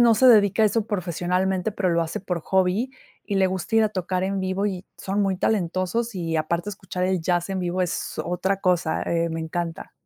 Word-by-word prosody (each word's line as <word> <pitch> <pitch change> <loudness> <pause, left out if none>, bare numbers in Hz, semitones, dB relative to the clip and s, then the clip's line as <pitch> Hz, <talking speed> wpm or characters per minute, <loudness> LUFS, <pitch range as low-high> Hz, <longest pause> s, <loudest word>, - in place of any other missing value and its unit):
no 235 -1 +6
se 255 +4 +6
dedica 215 -2 +5
a - - +7
eso 220 +1 0
profesionalmente, 185 +1 -1
pero 190 -3 0
lo 170 0 +2
hace 165 +1 -4
por 180 -3 -3
hobby 190 +8 +1 0.3
y 205 - -3
le 190 -1 +4
gusta 190 +4 -2
ir 225 - +6
a - - +2
tocar 185 -2 -2
en 195 0 -1
vivo, 190 +2 -1
y 190 -3 -4
son 195 +2 -1
muy 190 -1 +1
talentosos, 195 +4 0
y 165 -2 -1
aparte 170 +5 -1
escuchar 190 -2 -4
el 185 -1 +1
jazz 175 +2 0
en 190 - -1
vivo 180 +1 0
es 180 - -3
otra 185 +3 -1
cosa, 175 -4 +1
eh, 170 0 0
me 165 0 -3
encanta. 165 +2 -4
185 Hz, 215 wpm, -24 LUFS, 175-200 Hz, 0.3 s, a